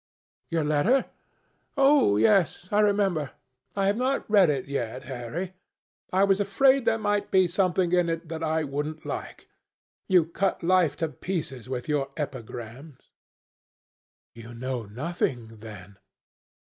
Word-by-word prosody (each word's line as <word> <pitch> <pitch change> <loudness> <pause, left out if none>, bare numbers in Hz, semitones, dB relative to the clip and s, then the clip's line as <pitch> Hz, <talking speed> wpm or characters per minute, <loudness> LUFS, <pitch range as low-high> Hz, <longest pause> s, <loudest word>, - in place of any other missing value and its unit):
"Your 165 -1 0
letter? 155 - +2 0.7
Oh, 275 - +5
yes, 175 - +2
I 205 - +3
remember. 200 -8 +1 0.4
I 195 -1 +1
have 200 +2 +2
not 260 +3 -1
read 200 -5 +5
it 140 -3 -1
yet, 130 -2 -4
Harry. 140 +9 -5 0.6
I 190 +1 +3
was 195 0 +3
afraid 260 +6 +3
there 225 - +3
might 205 -1 -1
be 185 -1 +4
something 180 0 +1
in 180 -1 +2
it 165 0 -3
that 160 0 -6
I 160 0 0
wouldn't 150 +2 -4
like. - - -6 0.6
You 180 -4 +4
cut 185 +3 -2
life 175 -4 +3
to - - -2
pieces 150 - -5
with 125 0 -4
your 145 -3 0
epigrams." 130 0 -7 1.2
"You 115 +1 -11
know 125 -2 -4
nothing 120 -2 -3
then?" 100 -3 -11
160 Hz, 135 wpm, -26 LUFS, 130-195 Hz, 1.2 s, Oh